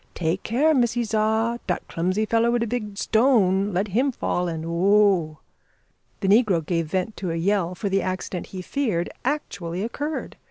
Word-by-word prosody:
"Take 170 Hz, +2 st, -1 dB
care, 285 Hz, +8 st, +2 dB
missy 240 Hz, -3 st, +2 dB
Za, 220 Hz, +2 st, 0 dB
dat 180 Hz, -, -2 dB
clumsy 185 Hz, +6 st, -1 dB
feller 230 Hz, +1 st, +2 dB
wid 240 Hz, -1 st, +1 dB
the -, -, 0 dB
big 210 Hz, -3 st, -4 dB
stone 210 Hz, -5 st, +3 dB
let 195 Hz, +3 st, -1 dB
him 255 Hz, +8 st, +1 dB
fall, 180 Hz, -7 st, -1 dB
and 165 Hz, -1 st, -4 dB
oh!" 180 Hz, -2 st, +3 dB, 0.8 s
The 195 Hz, -, 0 dB
negro 200 Hz, -6 st, +3 dB
gave 165 Hz, -1 st, -1 dB
vent 190 Hz, +6 st, -2 dB
to 185 Hz, -, -3 dB
a 165 Hz, -, -2 dB
yell, 180 Hz, 0 st, 0 dB
for 200 Hz, -, -3 dB
the 195 Hz, 0 st, +1 dB
accident 185 Hz, -1 st, -4 dB
he 185 Hz, -1 st, -7 dB
feared 215 Hz, -9 st, -1 dB
actually 200 Hz, -, -3 dB
occurred. 290 Hz, +7 st, -4 dB
200 Hz, 170 wpm, -24 LUFS, 180-230 Hz, 0.8 s, stone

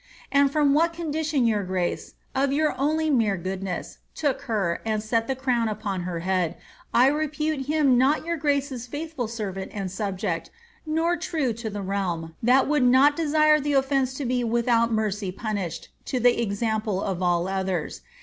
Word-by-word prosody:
And 280 Hz, -1 st, +4 dB
from 290 Hz, -1 st, +3 dB
what 330 Hz, +3 st, +3 dB
condition 310 Hz, -5 st, -1 dB
your 215 Hz, -3 st, +2 dB
grace, 185 Hz, -1 st, -3 dB, 0.2 s
of 270 Hz, 0 st, +1 dB
your 305 Hz, +2 st, +2 dB
only 310 Hz, +3 st, +1 dB
mere 220 Hz, -7 st, +2 dB
goodness, 185 Hz, +1 st, -5 dB, 0.2 s
took 290 Hz, -4 st, -1 dB
her, 195 Hz, -6 st, 0 dB
and 215 Hz, -1 st, -1 dB
set 225 Hz, +1 st, 0 dB
the 265 Hz, -, -1 dB
crown 250 Hz, -3 st, 0 dB
upon 210 Hz, -3 st, -3 dB
her 170 Hz, -2 st, -3 dB
head, 180 Hz, -2 st, 0 dB, 0.3 s
I 245 Hz, -, +5 dB
repute 300 Hz, 0 st, 0 dB
him 290 Hz, -5 st, +3 dB
not 280 Hz, +5 st, +2 dB
your 335 Hz, 0 st, -1 dB
grace's 280 Hz, -5 st, -1 dB
faithful 290 Hz, -2 st, -4 dB
servant 200 Hz, -4 st, -5 dB
and 195 Hz, -3 st, -3 dB
subject, 190 Hz, -3 st, -3 dB, 0.4 s
nor 330 Hz, +3 st, +1 dB
true 310 Hz, -7 st, -1 dB
to 225 Hz, 0 st, -5 dB
the 205 Hz, -1 st, -5 dB
realm, 180 Hz, -4 st, -2 dB
that 250 Hz, +4 st, +4 dB
would 300 Hz, 0 st, +2 dB
not 260 Hz, +4 st, +5 dB
desire 305 Hz, -1 st, +4 dB
the 290 Hz, 0 st, -1 dB
offence 270 Hz, -1 st, +1 dB
lo 280 Hz, -, -2 dB
be 250 Hz, 0 st, 0 dB
without 235 Hz, 0 st, +2 dB
mercy 210 Hz, -3 st, -1 dB
punished, 195 Hz, -5 st, -4 dB, 0.2 s
to 255 Hz, -, -1 dB
the 240 Hz, 0 st, +3 dB
example 215 Hz, -2 st, -1 dB
of 190 Hz, -2 st, -3 dB
all 175 Hz, 0 st, +1 dB
others. 190 Hz, -4 st, -2 dB
240 Hz, 170 wpm, -25 LUFS, 200-290 Hz, 0.4 s, I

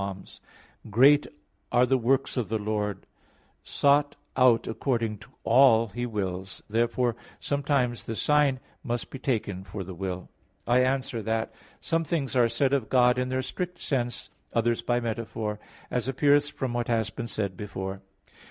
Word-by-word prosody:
110:2: 100 Hz, -1 st, -7 dB, 0.5 s
"Great 140 Hz, +7 st, +5 dB, 0.4 s
are 125 Hz, +1 st, +5 dB
the 135 Hz, -, +2 dB
works 130 Hz, +2 st, +1 dB
of 125 Hz, -4 st, -2 dB
the 110 Hz, -, 0 dB
Lord, 105 Hz, -2 st, -2 dB, 0.6 s
sought 145 Hz, 0 st, +2 dB, 0.2 s
out 125 Hz, -3 st, +4 dB
according 115 Hz, -3 st, -1 dB
to 105 Hz, -, -15 dB
all 115 Hz, -4 st, +5 dB
His 120 Hz, +4 st, -3 dB
wills." 95 Hz, -4 st, -4 dB
Therefore 115 Hz, +2 st, +1 dB, 0.2 s
sometimes 140 Hz, -4 st, 0 dB
the 115 Hz, -, -4 dB
sign 145 Hz, 0 st, +3 dB, 0.2 s
must 120 Hz, -2 st, -3 dB
be 135 Hz, -, -7 dB
taken 105 Hz, -8 st, -2 dB
for 100 Hz, 0 st, -6 dB
the 95 Hz, +1 st, -8 dB
will. 90 Hz, 0 st, -4 dB, 0.4 s
I 120 Hz, +1 st, +4 dB
answer 130 Hz, -3 st, -1 dB
that, 110 Hz, +1 st, -2 dB, 0.3 s
Some 165 Hz, 0 st, 0 dB
things 150 Hz, -5 st, -2 dB
are 120 Hz, -2 st, +4 dB
said 130 Hz, +4 st, +1 dB
of 135 Hz, -6 st, 0 dB
God 125 Hz, -1 st, +4 dB
in 125 Hz, 0 st, -1 dB
their 130 Hz, 0 st, -1 dB
strict 180 Hz, +7 st, -4 dB
sense; 120 Hz, -4 st, -3 dB, 0.2 s
others 115 Hz, 0 st, +1 dB
by 120 Hz, 0 st, +1 dB
metaphor, 110 Hz, -2 st, -3 dB, 0.3 s
as 125 Hz, -1 st, -1 dB
appears 145 Hz, +2 st, +3 dB
from 130 Hz, -4 st, -4 dB
what 120 Hz, -1 st, -1 dB
has 115 Hz, -2 st, 0 dB
been 120 Hz, -, -5 dB
said 100 Hz, -5 st, -3 dB
before 95 Hz, 0 st, -5 dB
(Q. -, -, -23 dB
120 Hz, 160 wpm, -27 LUFS, 110-130 Hz, 0.6 s, Great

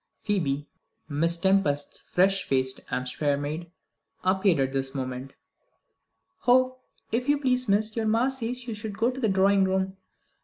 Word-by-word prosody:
Phoebe, 150 Hz, -9 st, -1 dB, 0.4 s
Miss 165 Hz, +3 st, +2 dB
Tempest's 170 Hz, -6 st, +1 dB
fresh 195 Hz, +2 st, +2 dB
faced 130 Hz, -1 st, 0 dB
Hampshire 130 Hz, +3 st, -1 dB
maid, 155 Hz, +4 st, -4 dB, 0.5 s
appeared 185 Hz, -3 st, +3 dB
at 135 Hz, 0 st, 0 dB
this 135 Hz, 0 st, -2 dB
moment. 130 Hz, 0 st, -5 dB, 1.1 s
"Oh, 255 Hz, +1 st, +4 dB, 0.3 s
if 245 Hz, +4 st, -1 dB
you 290 Hz, -, +4 dB
please, 255 Hz, -4 st, 0 dB
miss, 215 Hz, +2 st, +2 dB
your 225 Hz, -2 st, 0 dB
ma 230 Hz, +4 st, +3 dB
says 250 Hz, -1 st, -3 dB
would 220 Hz, -2 st, -6 dB
you 220 Hz, -, -3 dB
go 220 Hz, +4 st, 0 dB
to 260 Hz, -, -7 dB
the 225 Hz, -4 st, +1 dB
drawing 195 Hz, +1 st, +4 dB
room? 190 Hz, 0 st, -1 dB
190 Hz, 150 wpm, -27 LUFS, 145-225 Hz, 1.1 s, Oh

